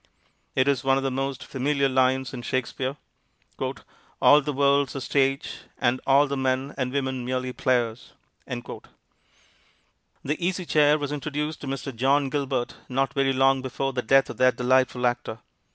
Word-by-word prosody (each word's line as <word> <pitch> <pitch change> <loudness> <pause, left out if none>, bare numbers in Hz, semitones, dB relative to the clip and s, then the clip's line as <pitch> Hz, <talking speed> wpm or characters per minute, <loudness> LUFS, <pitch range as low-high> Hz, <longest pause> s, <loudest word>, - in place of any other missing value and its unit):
It 130 0 +2
is 140 -2 +1
one 135 0 +3
of 135 - -2
the 135 - 0
most 135 0 -3
familiar 140 +1 0
lines 130 0 +1
in 125 - -5
Shakespeare, 130 +2 -3 1.2
"All 145 +1 +6
the 150 +1 -3
world's 140 0 +2
a - - -2
stage, 135 +1 0 0.2
And 125 0 +1
all 140 +2 +5
the 140 -1 -3
men 130 +1 -1
and 130 -2 -2
women 130 -2 -2
merely 130 0 -2
players." 120 -3 -1 0.3
The - - -6 1.7
Easy 185 0 -1
Chair 150 -1 +4
was 145 -1 -4
introduced 150 +1 -3
to 145 - -7
Mr. 135 -1 -4
John 135 +3 +2
Gilbert 135 -4 -2
not 135 +1 0
very 135 -1 +2
long 135 0 +3
before 135 +1 -3
the 125 - -1
death 135 +4 +3
of - - -11
that 130 -1 +4
delightful 125 0 +2
actor. 120 -2 -1
135 Hz, 160 wpm, -25 LUFS, 130-140 Hz, 1.7 s, All